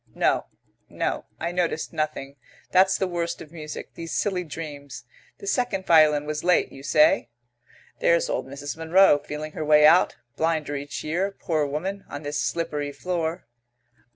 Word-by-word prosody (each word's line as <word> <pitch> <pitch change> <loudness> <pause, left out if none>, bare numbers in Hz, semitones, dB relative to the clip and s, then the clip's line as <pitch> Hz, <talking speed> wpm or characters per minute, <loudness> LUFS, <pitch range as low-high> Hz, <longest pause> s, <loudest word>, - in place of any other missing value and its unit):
"No, - - +1 0.4
no. - - -2
I 170 +1 -2
noticed 175 -1 -1
nothing. 150 -3 -3 0.4
That's 190 +1 +5
the 190 - 0
worst 170 -2 -3
of 150 - -11
music 155 -3 -8
these 165 0 -7
silly 185 -3 0
dreams. 145 -4 -8 0.3
The - - -11
second 200 -3 -1
violin 155 -3 +5
was 150 0 -3
late, 180 0 +3
you 135 - -11
say?" 140 -3 +3 0.7
"There's - - +3
old - - -2
Mrs. 140 +1 -6
Munro, 165 -1 +5
feeling 150 +1 -6
her 155 - -4
way 150 0 +6
out 170 +4 +5 0.2
blinder 155 -2 0
each 140 0 -5
year, 175 +6 0
poor 160 -6 -1
woman 190 +8 -4
on 145 +2 -7
this 145 0 -2
slippery 150 -3 -2
floor." 170 +1 -3
160 Hz, 155 wpm, -25 LUFS, 150-180 Hz, 0.7 s, way